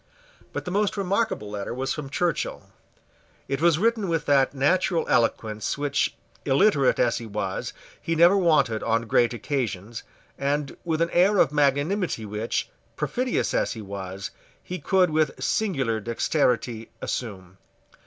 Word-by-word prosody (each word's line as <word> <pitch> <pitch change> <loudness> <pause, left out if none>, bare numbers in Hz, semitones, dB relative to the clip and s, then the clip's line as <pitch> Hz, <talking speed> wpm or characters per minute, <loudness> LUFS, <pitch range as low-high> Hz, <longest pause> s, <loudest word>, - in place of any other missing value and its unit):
But - - -5
the 180 - -4
most 205 +2 0
remarkable 195 - -1
letter 105 +2 -4
was 135 +1 -1
from 150 -3 -6
Churchill. 170 +5 -2 0.8
It 135 +2 -2
was 170 -2 +4
written 220 +1 +1
with 165 -2 0
that 135 -2 +3
natural 170 +5 +2
eloquence 110 -1 0
which, 145 -1 0 0.3
illiterate 140 0 +3
as 120 - +2
he 115 - -8
was, 95 -2 -3 0.3
he 165 - -1
never 170 +4 +6
wanted 155 - +3
on 115 0 +1
great 115 +1 +2
occasions, 120 -4 -3 0.4
and 140 +1 -1
with 165 -2 -1
an 170 - -3
air 190 +4 +4
of 145 - +4
magnanimity 145 - +1
which, 105 +2 -2 0.3
perfidious 255 0 -1
as - - +1
he 115 - -7
was, 95 -1 -6 0.3
he 180 0 -5
could 185 -3 +2
with 155 0 +1
singular 135 - 0
dexterity 115 0 0
assume. 95 -5 -5
140 Hz, 145 wpm, -25 LUFS, 115-175 Hz, 0.8 s, never